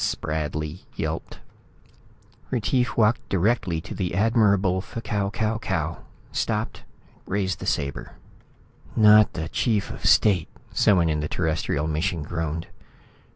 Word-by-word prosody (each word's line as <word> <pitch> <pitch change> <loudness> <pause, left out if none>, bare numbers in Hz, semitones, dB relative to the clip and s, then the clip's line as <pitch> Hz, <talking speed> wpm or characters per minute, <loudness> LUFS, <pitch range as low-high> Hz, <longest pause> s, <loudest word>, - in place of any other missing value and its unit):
Spradley 75 +1 -2 0.2
yelped. - - -4 1.1
Retief 125 +1 0
walked 115 +1 +2
directly 95 -3 +1
to - - -8
the 90 -3 -2
Admirable 100 -3 +3
F'Kau 100 -2 -3
Kau 110 +1 -1
Kau, 85 -5 -2 0.3
stopped, - - -2 0.5
raised 95 -1 -1
the - - -6
sabre. 70 -1 -2 0.8
"Not 105 -1 +6
the 80 -2 -3
chief 105 +2 0
of - - -9
state," 95 -7 +4 0.2
someone 90 -5 +4
in 75 -1 0
the 75 - -3
Terrestrial 80 -3 -1
mission 80 +1 -1
groaned. 80 +1 -3
95 Hz, 115 wpm, -25 LUFS, 80-105 Hz, 1.1 s, Not